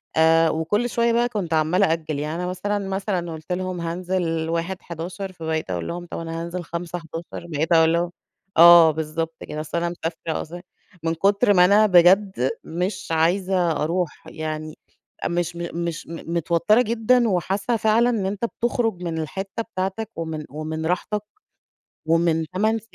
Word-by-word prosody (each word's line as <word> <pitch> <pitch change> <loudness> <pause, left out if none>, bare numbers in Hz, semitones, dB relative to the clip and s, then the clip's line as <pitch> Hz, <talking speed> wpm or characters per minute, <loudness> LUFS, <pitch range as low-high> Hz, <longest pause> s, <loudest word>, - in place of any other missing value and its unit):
آآ 160 0 +5
وكل 205 +10 0
شوية 235 0 +1
بقى 240 +1 +2
كنت 195 -8 -3
عَمّالة 160 +5 +3
أأجل، 155 -3 -2
يعني 150 +2 -3
أنا 180 +1 -3
مثلًا، 205 +3 -2
مثلًا 190 -3 -2
قُلت 160 +2 -9
لهم: 180 -1 -2
"هانزل 170 -1 -2
1/11" 175 +2 -4
فباقيت 160 - -3
أقول 85 -2 -3
لهم: 175 0 -5
"أنا 165 0 -4
هانزل 175 +1 -5
5/11" 170 0 -6
بقيت 160 +1 -2
أقول 160 0 +5
لهم 170 +1 0 0.5
آه، 170 -1 +9
بالضبط 160 +1 -3
كده، 150 0 -6
بس 155 +1 -5
أنا 170 0 0
مسافرة 165 -1 -4
أص 160 - -10 0.5
من 165 0 +1
كتر 200 +5 +3
ما 180 -2 +6
أنا 205 +3 +5
بجد 185 -5 +4
مش 180 +4 -3
عايزة 175 +2 +2
أروح 165 +3 -2
يعني، 155 0 -5 0.5
مش 175 0 -1
مش 170 -1 -4
متوترة 170 +5 +1
جدًا، 235 +1 +2
وحاسة 195 +6 0
فعلًا 220 +3 +3
إن 220 -5 0
أنت 200 +4 -2
بتخرج 230 -5 -1
من 165 -2 -3
الحتة 190 +8 -4
بتاعتك، 195 +4 -2
ومن 160 -2 -4
ومن 155 +2 -4
راحتك، 185 +5 -1 0.8
ومن 165 +1 +3 0.2
تمان 220 +3 +1
170 Hz, 150 wpm, -23 LUFS, 160-195 Hz, 0.8 s, آه